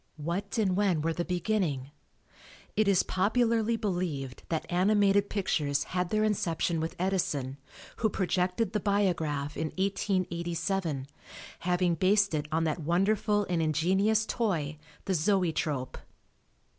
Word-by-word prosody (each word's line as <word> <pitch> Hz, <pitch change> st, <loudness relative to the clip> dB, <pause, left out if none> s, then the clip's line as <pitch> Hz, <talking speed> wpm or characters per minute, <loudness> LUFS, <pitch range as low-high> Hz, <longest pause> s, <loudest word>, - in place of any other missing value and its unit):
What 175 Hz, +8 st, -3 dB
and 195 Hz, -5 st, +2 dB
when 185 Hz, -6 st, +2 dB
were 165 Hz, 0 st, +1 dB
the 175 Hz, -, -2 dB
beginning? 175 Hz, -7 st, -1 dB, 0.8 s
It 215 Hz, -1 st, +2 dB
is 195 Hz, -3 st, +4 dB
popularly 230 Hz, +3 st, +1 dB
believed 175 Hz, -, -3 dB
that 160 Hz, -2 st, -1 dB
animated 200 Hz, +2 st, +3 dB
pictures 150 Hz, -8 st, 0 dB
had 180 Hz, -1 st, -2 dB
their 215 Hz, 0 st, +1 dB
inception 175 Hz, -5 st, 0 dB
with 160 Hz, +1 st, -3 dB
Edison 155 Hz, -8 st, -1 dB, 0.4 s
who 220 Hz, -, +1 dB
projected 185 Hz, +2 st, 0 dB
the 210 Hz, -, +1 dB
biograph 165 Hz, -8 st, 0 dB
in 160 Hz, -, -1 dB
1887, 175 Hz, -5 st, -1 dB, 0.5 s
having 180 Hz, 0 st, +1 dB
based 200 Hz, +3 st, +3 dB
it 150 Hz, -1 st, -1 dB
on 160 Hz, +1 st, +1 dB
that 160 Hz, +1 st, -1 dB
wonderful 200 Hz, +5 st, +1 dB
and 175 Hz, -2 st, 0 dB
ingenious 190 Hz, +8 st, +2 dB
toy, 160 Hz, -12 st, -1 dB, 0.3 s
the 195 Hz, -, 0 dB
Zoetrope. 160 Hz, -7 st, 0 dB
180 Hz, 125 wpm, -29 LUFS, 160-200 Hz, 0.8 s, is